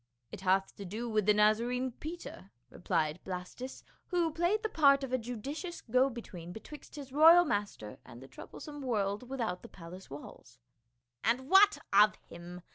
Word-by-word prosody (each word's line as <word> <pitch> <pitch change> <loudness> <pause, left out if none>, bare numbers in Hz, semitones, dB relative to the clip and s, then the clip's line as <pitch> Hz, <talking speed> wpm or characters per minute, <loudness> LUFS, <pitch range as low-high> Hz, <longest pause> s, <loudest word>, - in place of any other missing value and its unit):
" 120 0 -49
It - - -7
hath 190 0 +1
to 200 - -7
do 215 +6 -5
with 215 -3 0
the 210 - +6
Nazarene 235 +5 +2
Peter," 310 - -9 0.2
replied 165 -3 -1
Blastus, 185 +8 -7 0.2
who 345 -3 +1
played 345 +8 0
the - - +1
part 280 -6 +4
of 260 -1 -5
a - - +3
judicious 270 - -6
go 255 +3 +2
between 180 -8 -9
betwixt 285 - -11
his 280 -3 -9
royal 330 +4 +8
master 205 - -3
and 120 - -13
the 135 - -12
troublesome 290 - -10
world 210 -2 -2
without 230 -9 -3
the - - -12
palace 180 +1 -11
walls. 135 -3 -11 0.3
" 120 0 -52
And 250 +3 +1
what 405 +2 +7 0.2
of 210 +1 +6
him 175 +1 -11
220 Hz, 175 wpm, -32 LUFS, 180-275 Hz, 0.3 s, royal